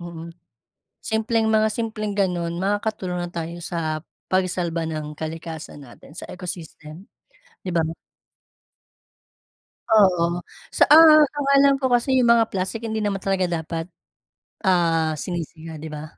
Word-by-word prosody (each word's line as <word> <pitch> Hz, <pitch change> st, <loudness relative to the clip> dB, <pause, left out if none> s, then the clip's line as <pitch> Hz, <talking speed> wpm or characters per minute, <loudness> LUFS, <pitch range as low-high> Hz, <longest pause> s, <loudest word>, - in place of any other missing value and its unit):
mm. 170 Hz, -1 st, -8 dB, 0.7 s
Simpleng 220 Hz, 0 st, 0 dB
mga, 220 Hz, 0 st, +3 dB
simpleng 215 Hz, -2 st, -3 dB
ganun 175 Hz, -2 st, -1 dB
makakatulong 195 Hz, -3 st, -2 dB
na 175 Hz, -, -6 dB
tayo 170 Hz, 0 st, -6 dB
sa 160 Hz, -2 st, -3 dB, 0.2 s
pagsalba 180 Hz, -3 st, -1 dB
ng 155 Hz, -2 st, -5 dB
kalikasan 160 Hz, -3 st, -7 dB
natin, 120 Hz, -, -16 dB
sa 165 Hz, -, -9 dB
ecosystem, 175 Hz, -1 st, -9 dB, 0.6 s
'di 180 Hz, -, -3 dB
ba? 165 Hz, -, +3 dB, 2.1 s
Oo 185 Hz, -5 st, +5 dB, 0.5 s
sa, -, -, +5 dB
ah, 310 Hz, -1 st, +9 dB
ang 285 Hz, -1 st, -2 dB
alam 275 Hz, 0 st, +6 dB
ko 265 Hz, -, +1 dB
kasi 255 Hz, +1 st, +2 dB
yung 245 Hz, -, +3 dB
mga 225 Hz, -1 st, +2 dB
plastik 195 Hz, +4 st, -3 dB
hindi 220 Hz, -1 st, -3 dB
naman 200 Hz, -2 st, -2 dB
talaga 190 Hz, -2 st, +1 dB
dapat, 165 Hz, -1 st, -4 dB, 0.8 s
ah, 165 Hz, -3 st, +2 dB
sinisiga, 160 Hz, -1 st, -6 dB
'di 160 Hz, -, -7 dB
ba? 150 Hz, -1 st, -7 dB
180 Hz, 130 wpm, -23 LUFS, 165-215 Hz, 2.1 s, ah